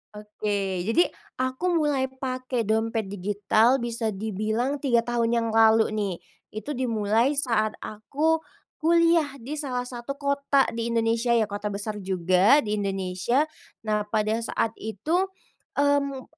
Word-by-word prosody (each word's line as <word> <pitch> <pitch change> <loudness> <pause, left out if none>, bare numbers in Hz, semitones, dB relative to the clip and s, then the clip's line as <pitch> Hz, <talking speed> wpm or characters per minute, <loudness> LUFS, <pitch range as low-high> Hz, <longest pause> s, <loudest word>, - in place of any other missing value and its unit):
Oke, 205 -3 -3
jadi 340 +10 +3 0.2
aku 260 +6 -2 0.2
mulai 275 -3 +1
pakai 255 -2 -3
dompet 220 -1 -1
digital 205 +5 +2
bisa 235 -3 -2
dibilang 220 +7 -2
3 240 -5 +2
tahun 235 -1 0
yang 230 -1 +1
lalu 225 0 +5
nih. 205 -4 -1 0.3
Itu 215 +7 -6
dimulai 230 +1 +1
saat 225 -6 +1
aku 295 +10 0 0.4
kuliah 330 -3 +3
di 290 +6 -5
salah 255 -4 -2
satu 245 +2 -6
kota 280 -1 +2
di 230 0 -3
Indonesia, 230 +1 +1
ya 225 - +4
kota 205 0 -4
besar 205 +1 -4
juga 185 - +3
di 210 -1 -1
Indonesia. 195 +6 0 0.4
Nah, 210 -1 -1
pada 215 +1 0
saat 225 -1 -1
itu, 310 - -1 0.5
mmm, 280 -2 +1
230 Hz, 130 wpm, -25 LUFS, 210-270 Hz, 0.5 s, lalu